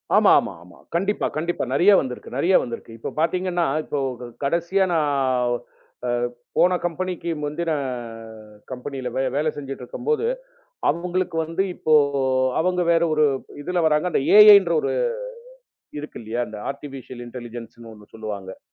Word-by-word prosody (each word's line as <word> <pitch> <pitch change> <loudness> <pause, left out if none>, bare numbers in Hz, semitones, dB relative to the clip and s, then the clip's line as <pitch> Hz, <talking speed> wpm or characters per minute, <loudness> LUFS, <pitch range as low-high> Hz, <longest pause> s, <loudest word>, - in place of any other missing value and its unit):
ஆமா, - - +6
ஆமா, - - -4
ஆமா. 90 0 -17 0.2
கண்டிப்பாக, 195 +4 0
கண்டிப்பாக. 165 -5 -2
நிறைய 180 +8 +5
வந்திருக்கு, 125 -2 -6
நிறைய 180 +6 +3
வந்திருக்கு. 115 -1 -7
இப்போ - - -5
பார்த்தீர்களென்றால் 170 -2 0
இப்போ 145 - -2 0.2
க - - -6 0.2
கடைசியா 170 +6 +1
நான் 130 -5 +1 1.0
போன 180 +1 +5
கம்பெனிக்கு 175 0 -3
முந்தின 160 +3 -2 1.0
கம்பெனி 130 +2 -6
யில் 125 - -4
வே - - +1
வேலை 155 +2 +1
செய்து - - -15
கொண்டு 135 -2 -6
இருக்கும்போது 450 - -2 0.6
அவர்களுக்கு 180 0 -1
வந்து 165 +4 -1
இப்போ 155 - +1 0.7
அவர்கள் 180 0 +1
வேறு 170 0 +4
ஒரு 155 0 +4 0.4
இதில் 180 +2 -1
வருகிறார்கள். 155 +3 +2
அந்த - - +1 0.2
AI 210 -1 +11
என்ற 170 -3 -1
ஒன்று - - -1 1.1
இருக்கு 150 +1 -8
இல்லையா? 115 +2 -2
இந்த, 105 - -8
ஆர்டிபிசியல் 135 -3 -8
இன்டெலிஜென்ஸ் 120 -2 -8
ன்னு 115 -1 -11
ஒன்று 105 -1 -18
சொல்லுவார்கள். 100 -4 -6
155 Hz, 145 wpm, -23 LUFS, 125-175 Hz, 1.1 s, AI